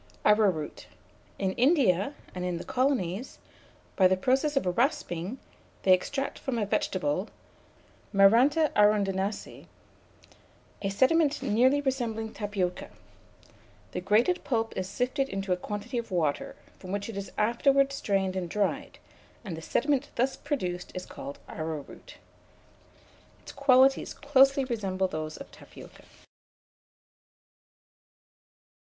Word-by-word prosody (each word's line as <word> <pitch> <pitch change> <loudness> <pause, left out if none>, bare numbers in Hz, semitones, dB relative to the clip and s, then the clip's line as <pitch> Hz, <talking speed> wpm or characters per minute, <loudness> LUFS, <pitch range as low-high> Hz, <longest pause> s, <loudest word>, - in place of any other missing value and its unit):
ARROWROOT. 200 -8 +2 0.5
In 190 -1 0
India, 250 - +2 0.2
and 180 - -5
in 180 -1 -2
the 170 - -6
colonies, 250 -5 -1 0.6
by 185 - +6
the 185 0 +2
process 270 +8 +1
of 275 - +1
rasping, 220 - -1 0.5
they 190 - +6
extract 270 +9 -1
from 260 -3 -3
a 215 - 0
vegetable 185 -2 -1 0.8
(Maranta 245 +10 +5
arundinacea) 205 -1 +1 1.1
a 195 - -1
sediment 285 +8 +2
nearly 260 +7 +3
resembling 230 -5 -2
tapioca. 200 -4 -3 1.0
The - - -4
grated 220 - +2
pulp 225 -5 -1
is 185 0 -3
sifted 260 +5 -1
into 195 -1 -1
a - - +1
quantity 210 +6 -4
of 230 - -7
water, 165 -6 -1 0.2
from 185 - -8
which 205 0 -3
it 225 - -7
is 200 0 -6
afterwards 270 +5 +3
strained 195 -7 -1
and 180 -2 -3
dried, 205 +1 -2 0.5
and 180 -5 -4
the 160 - -8
sediment 285 - 0
thus 255 +3 +1
produced 185 - -4
is 185 - -5
called 140 +1 -8
arrowroot. 155 -3 -7 1.3
Its - - -9
qualities 270 -1 +3
closely 275 -1 +4
resemble 195 -6 -1
those 155 -2 -5
of - - -11
tapioca. - - -14
210 Hz, 120 wpm, -28 LUFS, 185-265 Hz, 1.3 s, by